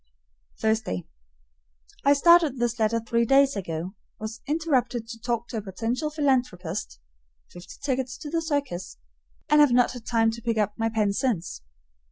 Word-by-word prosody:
Thursday. 220 - 0 1.0
I 280 - +6
started 320 -1 +5
this 240 0 -1
letter 225 +1 +2
three 230 +1 0
days 275 +3 +4
ago, 175 -1 -4 0.3
was 220 +1 -6
interrupted 275 -7 0
to 230 0 -8
talk 235 0 -2
to 230 - -4
a - - -2
potential 225 +9 -3
philanthropist 250 - -1 0.5
(fifty 175 0 -11
tickets 260 -2 -2
to 295 -2 -8
the 330 0 0
circus), 285 - -3 0.5
and 300 0 +5
have 290 -4 +5
not 245 0 +4
had 245 -3 -10
time 225 -1 +3
to 235 +1 -8
pick 230 -1 -1
up 210 -1 +1
my 225 0 0
pen 215 -3 +1
since. 200 - -2
235 Hz, 160 wpm, -26 LUFS, 215-275 Hz, 1.0 s, I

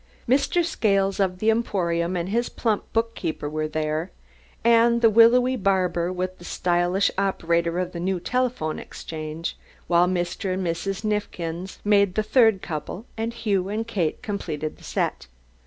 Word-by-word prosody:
Mr. 280 +7 +2
Scales 195 - +1
of 185 -2 +1
the 215 +4 +3
Emporium 180 -6 0
and 175 +1 -2
his 235 +4 0
plump 220 -3 -1
bookkeeper 225 -10 -2
were 155 +1 -2
there, 155 +2 -2 0.5
and 235 0 +5
the 225 - +7
willowy 245 +3 +6
barber 185 -5 +1
with 185 0 -4
the - - -12
stylish 175 +2 +1
operator 170 -3 0
of 180 0 -1
the 170 - -6
new 185 +1 -1
telephone 245 -6 -1
exchange, 155 +1 -6 0.3
while 175 0 +4
Mr. 185 +1 -1
and 190 0 -2
Mrs. 180 +4 -2
Neifkins 185 -4 -3
made 200 -2 +3
the 215 - +1
third 220 -4 +4
couple, 175 +6 -5
and 225 +1 -2
Hugh 205 -5 -1
and 220 +2 -2
Kate 180 -6 -1
completed 160 -9 -4
the - - -18
set. - - -2
190 Hz, 155 wpm, -24 LUFS, 170-220 Hz, 0.5 s, the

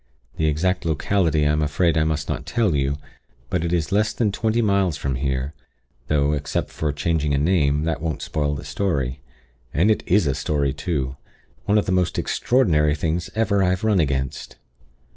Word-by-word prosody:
The 80 - +1
exact 90 +5 0
locality 80 -1 +1
I 75 - +3
am 75 0 +1
afraid 80 +3 +1
I 80 -1 +2
must 75 -2 -1
not - - -4
tell 115 -7 +1
you; 70 0 0 0.5
but 90 -2 0
it 85 - -1
is 85 -1 0
less 105 +2 +2
than 110 -4 +1
twenty 110 +3 0
miles 100 -7 +2
from 70 -2 -2
here; 65 +1 -2 0.5
though, 75 0 +2
except 70 -1 -2
for 75 -2 -2
changing 75 0 0
a - - +1
name, 75 -2 +2
that 80 -2 -2
won't 80 -2 -3
spoil 75 -1 -1
the 70 +1 -7
story. 70 -6 -2 0.5
And 90 +8 +4
it 110 - +1
is 95 0 +3
a 70 - +1
story 70 -1 0
too! 70 -6 -3 0.5
One 105 - +3
of 105 - +2
the - - -1
most 90 -1 +1
extraordinary 80 - +2
things 80 +2 -2
ever 110 -3 +2
I 90 - +3
have 90 +2 -1
run 105 -3 +3
against. 65 -4 -2
80 Hz, 190 wpm, -22 LUFS, 70-95 Hz, 0.5 s, And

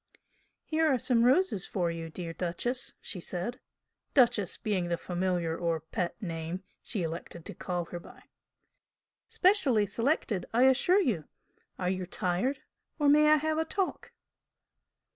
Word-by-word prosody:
"Here 320 0 +2
are 260 - +3
some 235 -1 +2
roses 260 - +3
for 175 -3 0
you, 165 -1 -5
dear 165 0 -6
'Duchess!'" 185 +10 -2
she 185 - -4
said, 185 +9 -3 0.6
"Duchess" 230 -8 +3
being 195 -5 -1
the 170 0 0
familiar 175 -2 -1
or 165 -1 -1
"pet" 170 +2 -4
name 165 0 -4 0.2
she 205 -7 -2
elected 165 0 -6
to - - -5
call 175 -2 -3
her 175 +1 -7
by. - - -15 1.0
"Specially 310 - +3
selected, 230 - 0
I 245 - +5
assure 275 +9 +5
you! 205 - 0 0.5
Are 180 -1 0
you 185 -1 -3
tired? 190 +11 -1 0.3
or 295 -2 +3
may 300 +1 +6
I - - +8
have 310 +1 0
a - - +2
talk?" 380 +3 -2
195 Hz, 145 wpm, -30 LUFS, 175-265 Hz, 1.0 s, I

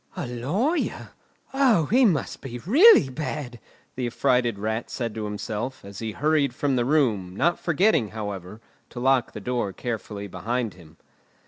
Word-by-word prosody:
"A - - -3
lawyer! 160 - -2 0.4
O, 255 - +4
he 250 - +4
must 170 - 0
be 125 -3 -6
really 265 - +6
bad!" 130 -3 -5 0.4
the 125 -1 -2
affrighted 120 -1 +1
Rat 110 +3 -3
said 115 -3 -4
to 110 -1 -4
himself, 105 +4 -5
as 100 -1 -9
he 110 -2 -4
hurried 145 -2 +1
from 140 -2 0
the 120 -1 +1
room, 115 -11 +1
not 170 - +1
forgetting, 170 - +2
however, 105 -1 -7 0.3
to 120 - -8
lock 130 -1 +2
the - - -6
door 120 -1 -2
carefully 105 -3 -5
behind 115 +3 -3
him. 80 -3 -17
120 Hz, 155 wpm, -25 LUFS, 110-150 Hz, 0.4 s, really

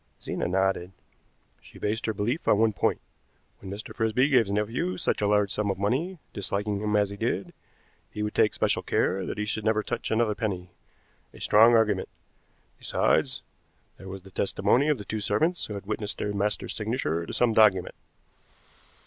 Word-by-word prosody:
Zena - - -3
nodded. 95 0 0 0.7
"She - - -16
based 110 +2 -2
her 110 - 0
belief 120 - -2
on - - +5
one 110 0 +3
point. - - 0 0.6
When 95 - -9
Mr. 100 +2 -7
Frisby 115 +5 +2
gave 125 -5 +4
his 100 - -5
nephew 105 -3 -1
such - - 0
a 105 - +2
large 105 -1 +2
sum 105 -1 -1
of 95 - -1
money, 135 - -1 0.2
disliking 100 +1 -2
him 105 0 0
as 100 -1 +2
he 100 - -7
did, 105 -3 -2 0.6
he 105 - -4
would 105 - -2
take 105 - +3
special - - +1
care 95 0 0
that - - -4
he 105 - -1
should 105 +1 -3
never 110 0 +1
touch 120 +1 -3
another 110 -1 +2
penny. 95 -5 -4 0.6
A - - -12
strong 115 +3 +6
argument. 105 -4 +2 0.7
Besides, - - +1 0.5
there 95 - -10
was 95 -1 -8
the 95 - -14
testimony 100 +9 +2
of 150 - +2
the 105 - -9
two 110 - -3
servants 110 - 0
who 105 - -6
had 100 - -7
witnessed 105 0 -3
their 105 - -2
master's 105 +1 -1
signature 105 - -1
to - - -5
some 120 -2 +2
document. 105 -5 +4
105 Hz, 185 wpm, -27 LUFS, 100-110 Hz, 0.7 s, strong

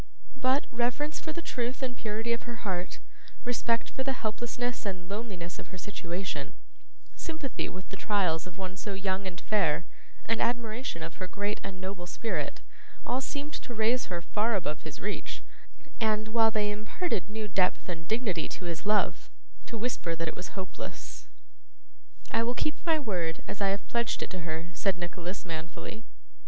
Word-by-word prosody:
But, 260 +2 +5
reverence 250 +6 +1
for 315 - -3
the 335 +2 -3
truth 250 +2 -1
and 250 -2 0
purity 225 +1 0
of 235 +1 -3
her 235 -1 -6
heart, 180 -2 0 0.5
respect 235 -1 +2
for 265 - -1
the 270 0 +2
helplessness 240 +2 0
and 185 -3 -2
loneliness 200 -4 -3
of - - -6
her 185 - -8
situation, 175 -6 -2 0.6
sympathy 315 -6 -2
with 185 0 -7
the - - -2
trials 185 -6 +3
of 180 +1 -9
one 190 0 -3
so 200 0 -2
young 190 0 +1
and 175 -2 -4
fair 170 -6 +3 0.4
and 230 - +2
admiration 235 - +1
of 165 +1 -5
her 185 - -2
great 205 +2 0
and 190 -1 -4
noble 185 -1 -3
spirit, 225 +5 -1 0.4
all 250 +2 +2
seemed 290 +2 -2
to 240 - -4
raise 225 +3 +4
her 175 -2 -2
far 215 +5 +3
above 155 -6 0
his 155 -2 -6
reach, 210 +2 -2 0.6
and, 215 -1 +3
while 225 0 +7
they 210 -2 +2
imparted 210 - 0
new 215 0 -2
depth 185 -2 +3
and 165 -2 -3
dignity 220 -7 +2
to 180 - -5
his 170 +3 -2
love, 210 0 +4 0.4
to 230 - -3
whisper 215 -7 0
that 165 0 -1
it - - -1
was 180 +2 -6
hopeless. 185 -1 -5 1.0
'I 225 - +4
will 240 +2 +2
keep 305 - +1
my 325 -1 +7
word, 180 - 0
as 205 - -4
I 200 - +5
have 195 +1 +1
pledged 235 -1 +2
it - - -5
to 185 - -2
her,' 165 +1 -2
said 195 -1 +3
Nicholas, 175 +2 -3
manfully. 170 +6 -4
205 Hz, 175 wpm, -32 LUFS, 180-235 Hz, 1.0 s, while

